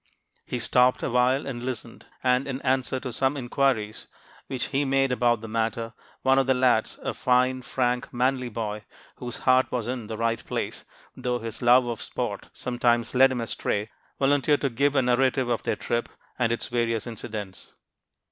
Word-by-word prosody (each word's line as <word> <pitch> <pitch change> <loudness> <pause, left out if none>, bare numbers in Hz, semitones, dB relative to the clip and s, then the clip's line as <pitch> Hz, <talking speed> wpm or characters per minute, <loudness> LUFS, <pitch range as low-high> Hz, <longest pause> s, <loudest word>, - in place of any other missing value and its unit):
He 125 - -2
stopped 125 +2 +3
awhile 125 +3 +2
and 125 -3 -5
listened; 125 -2 -6 0.2
and, 125 +1 +2
in 135 -1 -3
answer 130 0 +1
to 130 -3 -5
some 135 +4 +1
inquiries 120 -4 0 0.4
which 130 -2 -3
he 140 +1 +1
made 135 -1 +2
about 120 -2 +2
the 115 - -7
matter, 115 +1 -2 0.3
one 135 0 +5
of 135 - +1
the 130 - +4
lads, 125 -3 +2
a - - -2
fine, 130 +1 +2
frank, 125 0 -1
manly 125 0 0
boy, 105 -2 -4 0.3
whose 120 -1 -6
heart 130 0 +4
was 120 -3 -2
in 125 -3 -4
the 110 - -5
right 115 0 0
place, - - -4 0.3
though 125 -1 -1
his 115 -2 -6
love 125 +1 +6
of 120 -2 -4
sport - - -4
sometimes 120 -1 0
led 130 +1 +6
him 125 -2 -2
astray, 105 -2 -2 0.3
volunteered 145 +1 +3
to 140 - 0
give 140 +4 +1
a 135 - +4
narrative 130 +1 +2
of 120 - 0
their - - -1
trip 120 +2 -2 0.3
and 115 -2 +2
its 115 - -1
various 115 -2 -1
incidents. 110 -4 -7
125 Hz, 175 wpm, -26 LUFS, 115-130 Hz, 0.4 s, love